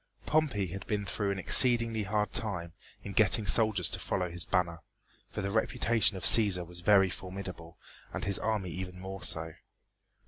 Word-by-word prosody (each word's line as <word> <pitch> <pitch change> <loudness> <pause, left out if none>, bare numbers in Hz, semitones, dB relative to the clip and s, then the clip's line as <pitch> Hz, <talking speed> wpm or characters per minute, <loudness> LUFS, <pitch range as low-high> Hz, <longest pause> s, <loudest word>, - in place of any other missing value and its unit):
Pompey 145 -10 0
had 95 +2 -9
been 105 -1 -3
through 100 +2 -3
an 100 - -3
exceedingly 115 +2 +2
hard 105 +1 -2
time 90 -8 -4 0.3
in 100 - -8
getting 110 +1 +4
soldiers 110 -5 +2
to - - -4
follow 90 -1 -3
his 85 0 +2
banner, 85 -3 -1 0.5
for - - -6
the 100 - -3
reputation 110 -1 0
of - - -9
Cæsar 100 -6 +7
was 90 +1 -7
very 95 -1 +3
formidable 90 -3 -9 0.3
and - - -5
his 100 -1 0
army 105 -5 -3
even 90 0 -8
more 95 +1 -8
so. 80 -2 +1
100 Hz, 170 wpm, -29 LUFS, 90-110 Hz, 0.5 s, Cæsar